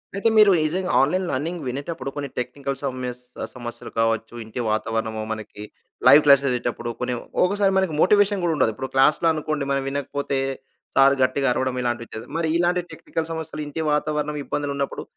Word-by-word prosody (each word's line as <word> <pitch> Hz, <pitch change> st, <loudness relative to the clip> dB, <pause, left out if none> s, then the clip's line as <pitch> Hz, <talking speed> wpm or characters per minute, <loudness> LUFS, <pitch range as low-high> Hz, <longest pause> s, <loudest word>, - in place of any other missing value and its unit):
అయితే 200 Hz, +3 st, +2 dB
మీరు 210 Hz, -2 st, +8 dB
నిజంగా 180 Hz, +4 st, -1 dB
ఆన్‌లైన్ 180 Hz, +8 st, +1 dB
లెర్నింగ్ 165 Hz, +5 st, -2 dB
వినేటప్పుడు 140 Hz, +3 st, -4 dB
కొన్ని 145 Hz, -1 st, -3 dB
టెక్నికల్ 135 Hz, +3 st, -3 dB
సమయస్ 125 Hz, -2 st, -4 dB, 0.2 s
ఆ! -, -, -1 dB
సమస్యలు 120 Hz, -1 st, -8 dB
కావచ్చు, 115 Hz, 0 st, 0 dB
ఇంటి 110 Hz, +3 st, -7 dB
వాతావరణము, 110 Hz, 0 st, -1 dB
మనకి 105 Hz, -1 st, -6 dB, 0.4 s
లైవ్ 150 Hz, -, +9 dB
క్లాసెస్ 140 Hz, -1 st, +6 dB
వినేటప్పుడు 120 Hz, -1 st, -2 dB
కొన్ని 125 Hz, 0 st, -1 dB, 0.3 s
ఒక్కోసారి 200 Hz, +1 st, +2 dB
మనకి 190 Hz, -5 st, +1 dB
మోటివేషన్ 205 Hz, 0 st, +4 dB
గూడా 170 Hz, -, +2 dB
ఉండాలి. 120 Hz, -5 st, +2 dB
ఇప్పుడు 130 Hz, +4 st, -5 dB
క్లాస్‌లో 150 Hz, +5 st, +4 dB
అనుకోండి, 155 Hz, -2 st, -2 dB
మనం 135 Hz, 0 st, +1 dB
వినకపోతే 140 Hz, 0 st, -2 dB, 0.6 s
సార్ 135 Hz, 0 st, +6 dB
గట్టిగా 135 Hz, +1 st, +1 dB
అరవడం 130 Hz, 0 st, -1 dB
ఇలా 120 Hz, -, 0 dB
అనిపిచ్చేది. 115 Hz, -1 st, -8 dB
మరి 165 Hz, -1 st, 0 dB
ఇలాంటి 175 Hz, +1 st, +2 dB
టెక్నికల్ 160 Hz, 0 st, -4 dB
సమస్యలు, 160 Hz, -1 st, -5 dB
ఇంటి 155 Hz, +2 st, -4 dB
వాతావరణం, 150 Hz, 0 st, 0 dB
ఇబ్బందులున్నప్పుడు 140 Hz, -1 st, -3 dB
140 Hz, 160 wpm, -23 LUFS, 125-160 Hz, 0.6 s, లైవ్